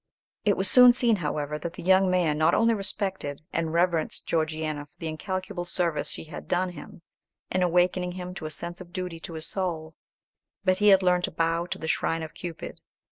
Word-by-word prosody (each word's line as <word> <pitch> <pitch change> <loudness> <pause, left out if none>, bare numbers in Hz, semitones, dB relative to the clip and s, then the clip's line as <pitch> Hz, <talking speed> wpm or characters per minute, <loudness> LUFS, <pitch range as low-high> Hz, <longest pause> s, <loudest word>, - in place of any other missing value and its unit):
It 205 -2 +3
was 190 - +2
soon 250 +4 +8
seen, 240 -3 +2
however, 150 -2 -2
that 170 +2 -5
the - - -9
young 190 +1 +4
man 175 -4 +2
not 160 +2 +4
only 230 0 +4
respected 195 -8 -3
and 165 -1 -1
reverenced 170 -1 0
Georgiana 155 -2 -2
for 145 - -36
the - - -7
incalculable 185 +3 -4
service 175 -3 -1
she - - -1
had 160 - -9
done 180 +1 +1
him, 170 -1 -12 0.5
in 185 - +1
awakening 180 0 +2
him 180 0 -6
to 160 -4 -5
a - - -5
sense 175 +4 -6
of 175 -1 -12
duty 180 -3 -4
to 165 - -8
his 160 0 -5
soul, 165 -5 -3 0.7
but 185 0 +3
he 210 - +3
had 195 -2 +7
learned 180 -1 +3
to - - -7
bow 165 +1 0
to - - -4
the 160 - -6
shrine 165 0 0
of 155 - -8
Cupid. 170 -2 -7
175 Hz, 205 wpm, -27 LUFS, 160-185 Hz, 0.7 s, soon